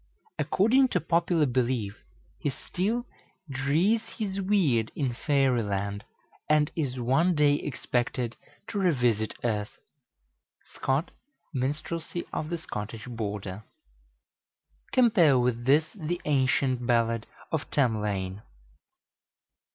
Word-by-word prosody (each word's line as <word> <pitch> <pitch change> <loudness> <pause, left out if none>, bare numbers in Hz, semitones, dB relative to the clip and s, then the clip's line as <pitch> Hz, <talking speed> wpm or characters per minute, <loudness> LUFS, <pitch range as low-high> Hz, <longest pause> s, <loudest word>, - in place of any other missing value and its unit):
According 255 +7 +4
to 185 - 0
popular 170 0 +2
belief, 120 -5 -1 0.4
he - - 0
still 205 - -2 0.4
"drees 155 +11 +2 0.2
his 200 -3 -2
weird" 165 - +2
in 135 -5 -1
Fairy 135 -2 +2
Land, 100 0 -2 0.5
and 150 -1 +3
is 135 -6 -2
one 160 +9 +3
day 150 -1 +4
expected 125 -3 -2 0.3
to 205 - -2
revisit 125 - +2
earth. 105 -3 -2 1.0
(Scott, 135 +6 0 0.4
"Minstrelsy 155 +6 -3
of 155 - -2
the 170 - -1
Scottish 110 -7 -6
Border.") 105 -4 -5 1.3
Compare 210 - +5
with 120 -1 0
this 145 +4 +5
the 175 -2 -3
ancient 130 -3 +1
ballad 115 -1 +2 0.2
of 160 -1 -2
Tamlane. 105 -7 0
135 Hz, 105 wpm, -28 LUFS, 115-165 Hz, 1.3 s, Compare